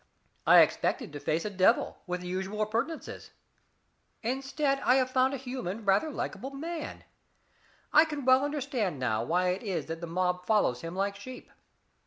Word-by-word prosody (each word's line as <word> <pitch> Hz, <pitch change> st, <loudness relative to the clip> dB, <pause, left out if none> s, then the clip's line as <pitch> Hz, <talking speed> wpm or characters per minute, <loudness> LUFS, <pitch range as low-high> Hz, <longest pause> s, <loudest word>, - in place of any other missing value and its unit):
I -, -, +9 dB
expected -, -, 0 dB
to 145 Hz, -, -5 dB
face 155 Hz, +5 st, -1 dB
a -, -, -1 dB
devil, 190 Hz, -1 st, +2 dB
with 180 Hz, 0 st, -3 dB
the 180 Hz, -, -7 dB
usual 190 Hz, +4 st, -2 dB
appurtenances. 235 Hz, +10 st, -4 dB, 0.9 s
Instead 275 Hz, +3 st, 0 dB
I 255 Hz, -, +3 dB
have 255 Hz, -1 st, +2 dB
found 260 Hz, +1 st, +2 dB
a -, -, -3 dB
human, 245 Hz, -5 st, -5 dB
rather 200 Hz, +10 st, +3 dB
likable 270 Hz, -2 st, -4 dB
man. 315 Hz, +3 st, -6 dB, 0.9 s
I 310 Hz, -, +8 dB
can 295 Hz, -4 st, -5 dB
well 260 Hz, +1 st, +5 dB
understand 275 Hz, -, -2 dB
now 115 Hz, -4 st, 0 dB
why 180 Hz, +7 st, +1 dB
it 185 Hz, +2 st, -1 dB
is 180 Hz, -9 st, -3 dB
that 165 Hz, +1 st, -6 dB
the 170 Hz, -, -5 dB
mob 180 Hz, +1 st, -1 dB
follows 165 Hz, -, +2 dB
him 165 Hz, +2 st, -6 dB
like 200 Hz, +1 st, -1 dB
sheep. 250 Hz, +5 st, -10 dB
215 Hz, 170 wpm, -29 LUFS, 180-270 Hz, 0.9 s, I